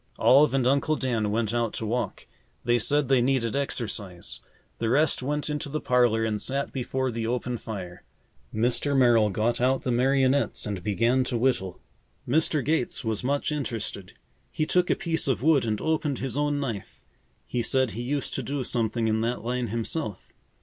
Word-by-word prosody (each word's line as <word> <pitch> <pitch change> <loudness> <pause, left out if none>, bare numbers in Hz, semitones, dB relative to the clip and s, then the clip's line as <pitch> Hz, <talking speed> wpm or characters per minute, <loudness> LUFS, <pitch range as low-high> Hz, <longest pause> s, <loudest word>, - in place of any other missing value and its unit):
Olive 140 +2 +5
and 130 -2 +2
Uncle 140 +4 +2
Dan 115 -7 -1
went 110 +1 0
out 120 -2 0
to 110 - -4
walk. 120 +3 -3 0.4
They 120 0 +2
said 145 +4 +2
they 130 -1 +4
needed 125 -2 +1
exercise. 105 -10 -3 0.4
The 115 - 0
rest 145 +4 +3
went 145 +3 -2
into 150 0 -3
the 155 +2 -2
parlor 120 -4 +2
and 105 -2 -1
sat 140 +1 -2
before 130 0 -2
the 115 -1 -3
open 125 0 -2
fire. 95 -6 -7 0.5
Mr. 125 +5 +1
Merrill 120 -4 +5
got 110 +5 0
out 130 +1 +2
the 125 - -1
marionettes 135 +2 +2
and 100 -3 -4
began 115 +6 +2
to 125 - -1
whittle. 115 -7 0 0.5
Mr. 150 +1 +1
Gates 150 -6 0
was 110 0 -1
much 140 +3 0
interested. 115 -9 -4 0.4
He 155 - -1
took 180 +2 +2
a - - +3
piece 165 -3 -2
of 125 -4 0
wood 150 -5 +4
and 110 -2 -1
opened 155 -3 0
his 135 -1 -3
own 145 0 0
knife. 115 -8 -5 0.4
He 120 - -2
said 130 0 +1
he 115 - -5
used 135 +2 -2
to - - -2
do 140 -1 -3
something 115 -1 -1
in 110 0 +1
that 115 +1 -2
line 125 +1 -1
himself. 115 - -4
125 Hz, 180 wpm, -26 LUFS, 115-140 Hz, 0.5 s, Olive